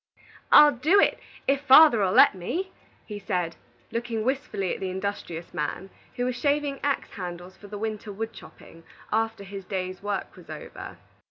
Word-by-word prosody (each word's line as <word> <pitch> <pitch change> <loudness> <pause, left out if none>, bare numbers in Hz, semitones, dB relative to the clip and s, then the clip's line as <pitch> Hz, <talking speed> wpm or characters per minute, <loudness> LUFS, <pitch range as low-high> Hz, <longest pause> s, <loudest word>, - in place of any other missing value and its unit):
"I'll 300 0 +9
do 310 +10 +3
it, - - +3 0.3
if 275 0 +2
father'll 265 -8 +7
let - - +7
me," 340 - -4 0.3
he 210 -1 -7
said, 180 -5 -2 0.4
looking 230 -1 -3
wistfully 240 -7 -2
at - - -6
the 190 - -3
industrious 185 -3 -5
man, 175 +6 -4 0.2
who 245 - -1
was 250 -1 -1
shaving 285 +1 0
axe 285 -1 -1
handles 180 -1 -7
for 205 - -14
the 205 +1 -7
winter 215 0 -4
wood 225 +3 -5
chopping, 165 -6 -14 0.3
after 225 -1 -1
his 195 0 -8
day's 185 -1 -4
work 205 -1 -4
was - - -16
over. - - -9
210 Hz, 165 wpm, -26 LUFS, 185-255 Hz, 0.4 s, I'll